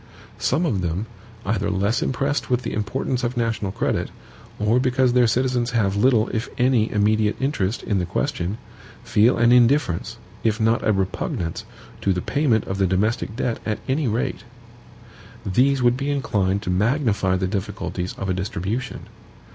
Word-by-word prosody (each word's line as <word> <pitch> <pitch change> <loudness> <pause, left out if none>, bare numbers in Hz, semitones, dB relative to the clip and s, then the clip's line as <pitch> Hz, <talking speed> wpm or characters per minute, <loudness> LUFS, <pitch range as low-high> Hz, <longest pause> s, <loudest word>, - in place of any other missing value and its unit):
Some 140 +9 +1
of 105 - 0
them, 90 +4 -2 0.4
either 100 -1 0
less 100 +5 0
impressed 140 +2 -1
with 125 0 +1
the - - -3
importance 125 +4 -2
of 120 +1 -2
national 115 -4 -1
credit, - - -1 0.5
or 105 +4 +2
because 130 -1 +2
their 125 -1 +5
citizens 125 0 0
have 100 -3 +1
little, 115 +1 +3
if 115 0 -3
any, 125 -3 +2
immediate 105 0 +2
interest 125 -7 -1
in 100 -3 0
the 90 - -2
question, 90 +3 -2 0.5
feel 110 +5 +3
an 120 0 +4
indifference, 125 - +3 0.3
if 110 0 +1
not 115 +1 +2
a 110 - +3
repugnance, 95 -3 -2 0.4
to 95 - +2
the 90 - -2
payment 135 -8 +1
of 95 +1 -4
the 95 - +3
domestic 105 +4 0
debt 120 -1 -1
at 110 -1 -2
any 140 +1 0
rate. 110 -1 -2 1.0
These 130 +7 +2
would 120 0 +4
be 140 +1 -2
inclined 100 -8 0
to 90 - -2
magnify 105 -2 +1
the 95 0 0
difficulties 95 -2 -3
of 95 - -4
a 95 - +1
distribution. 100 +6 -3
110 Hz, 165 wpm, -22 LUFS, 100-125 Hz, 1.0 s, their